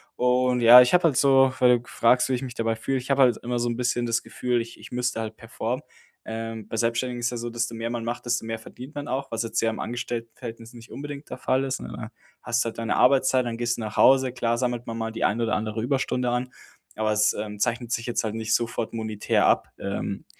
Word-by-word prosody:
Und 125 0 +2
ja, 120 +2 +10
ich 125 - +3
habe 180 -1 +5
halt 140 -5 +3
so, 135 -1 +5
weil 125 -1 +5
du 120 - -18
fragst, 125 +2 +3
wie - - +1
ich 125 - -4
mich 125 -2 -6
dabei 115 -1 -1
fühle, 135 +4 -2
ich 130 - -10
habe 135 -1 +5
halt 120 -3 +4
immer 120 0 -3
so 120 0 0
'n 120 - -2
bisschen 120 0 0
das 115 0 0
Gefühl, 125 -1 -1
ich 115 0 -10
ich - - -12
müsste 125 -1 -1
halt 110 0 -4
performen. - - -4 0.5
Ähm, 115 -1 -5
bei - - -6
Selbstständigen 120 +2 -1
ist 120 - +1
ja 120 - -4
so, 120 +1 -4
desto 115 0 -2
mehr 115 +1 -4
man 120 -1 -3
macht, 120 +1 -4
desto 120 -1 -1
mehr 115 0 -4
verdient 130 +6 -11
man 145 0 -5
auch, 135 +1 -3
was 115 0 -1
jetzt 115 - -1
ja 115 - +2
im 110 - -5
Angestelltenverhältnis 115 -1 -6
nicht 115 -1 -13
unbedingt 145 +1 -7
der 125 - -6
Fall 130 +1 +1
ist, 130 -1 -3
ne? - - -7
Da 110 +1 -7 0.3
hast 120 0 +1
du - - -4
halt 115 - -6
deine 115 0 -1
Arbeitszeit, 130 -1 +4
dann 115 -1 -3
gehst 120 0 -1
du - - -5
nach 105 -1 -5
Hause. 130 -1 +5
Klar 120 -1 0
sammelt 120 -1 -2
man 115 0 -5
mal 115 0 -3
die - - -4
ein 110 +3 +2
oder 115 -2 +1
andere 110 +1 -2
Überstunde 125 -1 0
an, 125 +1 -1 0.5
aber 110 0 +1
es, 105 0 +3
ähm, 105 -1 -6
zeichnet 120 +2 -1
sich 115 +1 -2
jetzt 120 - -1
halt 110 0 -3
nicht 110 0 -1
sofort 115 -1 -2
monetär 110 -2 0
ab. - - +2
Ähm, 100 0 -4
120 Hz, 255 wpm, -25 LUFS, 115-125 Hz, 0.5 s, ja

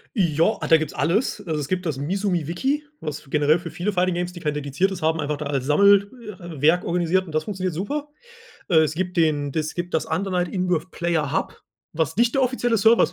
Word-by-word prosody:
Jo, 170 +1 +2
äh, - - -2
da 165 - +7
gibt's 155 0 -4
alles. 200 - 0
Also 155 -3 -2
es 140 - -3
gibt 185 0 -2
das 145 -4 -2
„Mizuumi 175 +2 -1
Wiki“, 270 - -1 0.2
was 150 -2 -6
generell 150 +2 +3
für 165 -2 -8
viele 180 +5 -2
Fighting 185 -1 +1
Games, 175 +1 -2
die 175 - -10
kein 150 -3 -1
dediziertes 150 +7 -1
haben, 160 +1 +1
einfach 150 0 -2
da 150 - -5
als 135 -3 -2
Sammel 200 +7 +5 0.3
äh, 170 -5 -9
Werk 165 +4 +4
organisiert 175 +2 +1
und 160 - -10
das 155 - 0
funktioniert 185 -4 -3
super. 285 - -3 0.6
Äh, 160 -2 +6
es 155 - -1
gibt 180 +1 -3
den 150 -3 +2
das 155 +1 -2
gibt 175 0 -5
das - - 0
„Undernight-In-Birth-Player-Hub“, 175 -4 -1 0.3
was 160 0 -1
nicht 235 +4 +2
der 270 - +3
offizielle 245 -2 +1
Server 225 +3 +5
ist - - +3
175 Hz, 210 wpm, -23 LUFS, 155-190 Hz, 0.6 s, da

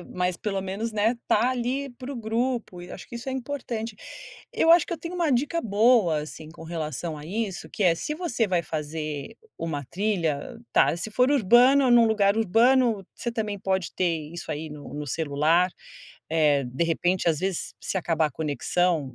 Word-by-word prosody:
e - - -11
mas 180 -1 -2
pelo 195 -1 -2
menos, 195 +4 -3
né, 215 +3 +2
tá 250 - +3
ali 255 +3 -2
para 250 +2 -8
o - - -6
grupo 230 -4 -2
e 175 - -10
acho 185 - -9
que - - -10
isso 240 +3 -7
é - - -2
importante. 245 -4 -4 0.6
Eu 325 - +3
acho 335 -1 +6
que - - -5
eu 335 - -3
tenho 335 +3 -6
uma 340 -4 +1
dica 295 +7 +1
boa, 215 -5 +4
assim, 155 +1 -9
com 165 - -12
relação 160 -1 -4
a 150 - -10
isso, 200 0 -3
que - - -3
é, 175 -2 +5
se 300 - -4
você 305 -9 -1
vai 180 -2 +1
fazer 150 -2 -5 0.2
uma 150 -4 -3
trilha, 190 - -2
tá, - - +4
se 215 +5 -5
for 250 +5 +3
urbano, 255 +2 +5
num 240 -1 +7
lugar 205 -2 +3
urbano, 225 0 +3
você 240 - -4
também 215 -3 -3
pode 190 -2 -1
ter 165 -4 -1
isso 170 -1 -7
aí 155 +1 -4
no 145 -1 -9
no 150 0 -5
celular, 160 +5 +2 0.6
eh, 150 -4 +3
de 125 +7 -1
repente, 175 +2 +1
às 155 -3 +1
vezes, 190 -2 -2
se 190 - -2
acabar 165 -3 +1
a - - -5
conexão, 155 0 0
190 Hz, 195 wpm, -26 LUFS, 160-240 Hz, 0.6 s, num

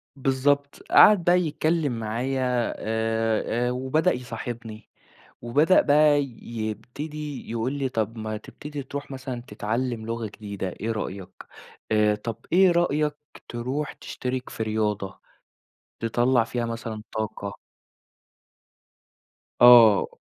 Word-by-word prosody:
بالضبط، 140 +1 0
قعَد 205 -4 +7
بقى 175 +1 +4
يتكلّم 155 -5 0
معايا 125 +2 -1
آآ، 115 +2 0
وبدأ 130 +8 +1
يصاحبني 115 -2 -7 0.5
وبدأ 145 +10 +4
بقى 145 0 +4 0.2
يبتدي 120 +7 -6
يقول 115 +3 -1
لي: 140 -2 -2
"طَب 115 -2 -2
ما 110 0 -4
تبتدي 145 +6 -8
ترُوح 140 +2 -7
مثلًا 130 -2 -5
تتعلّم 115 +1 -3
لغة 115 0 -3
جديدة 100 -2 -6
إيه 110 +5 -4
رأيك؟ 95 -3 -6 0.5
آآ 105 -1 +3
طَب 110 +1 -5 0.2
إيه 185 0 +6
رأيك 155 -3 +1 0.3
ترُوح 130 +5 -3
تشتِرك 125 0 -5
في 110 - -4
رياضة 105 -3 -2 0.8
تطلّع 120 +2 +2
فيها 120 +1 -3
مثلًا 115 -2 -5
طاقة؟" 105 -2 -4 2.0
آه. 120 -4 +8
120 Hz, 105 wpm, -25 LUFS, 110-140 Hz, 2.0 s, آه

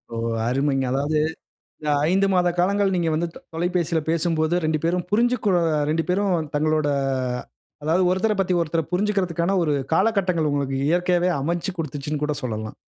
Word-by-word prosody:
ஓ! - - -4 0.3
அருமைங்க. 135 +1 +1
அதாவது 145 +3 0 0.6
இந்த 150 - -4 0.2
5 195 +2 +3
மாத 180 -1 +3
காலங்கள் 195 +2 +2
நீங்க 170 -2 +1
வந்து 170 +2 0
த - - -10 0.2
தொலைபேசில 170 -1 0
பேசும்போது 165 0 +1
2 155 0 +1
பேரும் 175 +1 0
புரிஞ்சுக்கொ 235 0 +2 0.4
2 165 +1 +1
பேரும் 180 -5 +1
தங்களோட, 155 0 +1 1.0
அதாவது 165 +5 +2
ஒருத்தர 210 +4 +1
பத்தி 185 -1 +1
ஒருத்தர் 165 0 -2
புரிஞ்சுக்குறதுக்கான, 190 -2 0
ஒரு 150 -2 +1 0.2
காலகட்டங்கள் 185 -5 +2
உங்களுக்கு 135 -2 -1
இயற்கையாவே 175 +1 +2
அமைச்சு 170 +5 -2
கொடுத்துச்சுனு 150 -1 -4
கூட 150 0 -1
சொல்லலாம். 110 -3 -4
170 Hz, 145 wpm, -23 LUFS, 155-185 Hz, 1.0 s, 5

